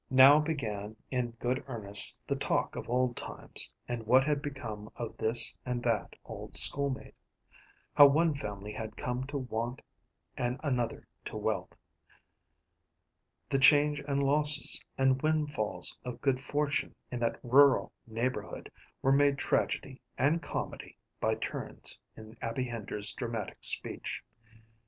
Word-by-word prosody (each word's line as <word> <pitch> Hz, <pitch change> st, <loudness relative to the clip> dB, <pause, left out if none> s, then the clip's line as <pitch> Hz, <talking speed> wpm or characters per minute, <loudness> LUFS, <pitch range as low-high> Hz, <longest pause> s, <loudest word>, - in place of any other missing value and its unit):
Now 130 Hz, +3 st, +7 dB
began 110 Hz, -9 st, -4 dB, 0.2 s
in 125 Hz, -2 st, -1 dB
good 125 Hz, +2 st, -2 dB
earnest 105 Hz, -5 st, +6 dB
the -, -, -2 dB
talk -, -, -1 dB
of -, -, -7 dB
old 125 Hz, 0 st, 0 dB
times, -, -, +2 dB, 0.2 s
and 115 Hz, -3 st, -5 dB
what 130 Hz, +3 st, +5 dB
had 145 Hz, 0 st, -1 dB
become 110 Hz, -7 st, -7 dB
of 115 Hz, -2 st, -6 dB
this 115 Hz, +1 st, +4 dB
and 125 Hz, -1 st, -4 dB
that 115 Hz, -3 st, -1 dB
old -, -, -9 dB
schoolmate; 140 Hz, -2 st, +1 dB, 0.8 s
how 145 Hz, -, +8 dB
one 160 Hz, +3 st, +2 dB
family 105 Hz, -6 st, -7 dB
had 110 Hz, 0 st, -7 dB
come 125 Hz, +1 st, -4 dB
to 140 Hz, 0 st, -4 dB
want 120 Hz, -1 st, -5 dB, 0.5 s
and 125 Hz, +2 st, -3 dB
another 125 Hz, -5 st, -2 dB, 0.2 s
to -, -, -6 dB
wealth. -, -, -3 dB, 1.8 s
The 135 Hz, -, +2 dB
changes 145 Hz, +1 st, +4 dB
and 140 Hz, 0 st, 0 dB
losses 150 Hz, 0 st, +4 dB
and 130 Hz, 0 st, +2 dB
windfalls 150 Hz, -8 st, 0 dB
of 125 Hz, -1 st, -7 dB
good 135 Hz, -2 st, 0 dB
fortune 145 Hz, +1 st, -2 dB, 0.2 s
in 125 Hz, -, -4 dB
that 115 Hz, -1 st, -2 dB
rural 135 Hz, +2 st, +4 dB
neighborhood 120 Hz, +3 st, -4 dB, 0.3 s
were 135 Hz, -, +3 dB
made 140 Hz, 0 st, +3 dB
tragedy 135 Hz, -1 st, -2 dB, 0.2 s
and 150 Hz, +6 st, +1 dB
comedy -, -, -6 dB, 0.2 s
by -, -, 0 dB
turns -, -, -2 dB, 0.2 s
in 110 Hz, +1 st, -12 dB
Abby 115 Hz, +3 st, -3 dB
Hender's 110 Hz, -4 st, -1 dB
dramatic 115 Hz, -4 st, -5 dB
speech. -, -, +1 dB
130 Hz, 135 wpm, -30 LUFS, 115-140 Hz, 1.8 s, how